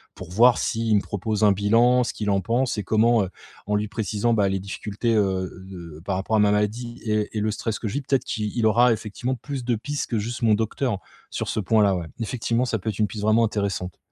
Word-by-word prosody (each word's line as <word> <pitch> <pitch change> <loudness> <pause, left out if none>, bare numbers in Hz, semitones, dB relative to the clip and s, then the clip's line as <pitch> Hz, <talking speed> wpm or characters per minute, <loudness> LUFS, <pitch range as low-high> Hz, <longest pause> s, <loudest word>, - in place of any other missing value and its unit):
pour 90 -1 -10
voir 120 +5 +5
s'il 115 -2 0
me 100 - +3
propose 105 +2 -2
un 105 - +6
bilan, 115 +5 +4
ce - - -3
qu'il 105 -1 -3
en 100 -1 +3
pense 120 +3 0
et 105 - -2
comment, 110 +1 +3
heu, - - -7 0.4
en 105 - +1
lui 105 0 -1
précisant, 110 +1 0
bah, 100 -3 +3
les 95 0 -1
difficultés, 105 +4 -3
heu, 95 -3 +1 0.2
de 85 -4 -10
par 95 - -1
rapport 100 +4 0
à - - +3
ma 105 0 +4
maladie 115 +4 -1
et 105 -1 -1
et - - +1
le 110 +1 0
stress 110 0 -3
que 110 - -4
je 100 - -5
vis, 145 - 0
peut-être 135 -1 0
qu'i 105 -1 -3
il 115 - +1
aura 115 +2 +5
effectivement 120 +4 -3
plus 135 -1 -6
de 120 -1 +1
pistes 145 +7 -4
que 115 - 0
juste 115 +4 -4
mon 110 - +5
docteur 110 0 -1 0.3
sur - - -4
ce - - -1
point-là, 105 -1 +3
ouais. 85 -2 -5
Effectivement, 115 +1 -1
ça 115 -3 -1
peut 105 - -3
être 105 -1 -5
une 105 - +3
piste 105 0 -7
vraiment 110 +2 +4
intéressante. 100 -5 -2
110 Hz, 245 wpm, -24 LUFS, 100-115 Hz, 0.4 s, un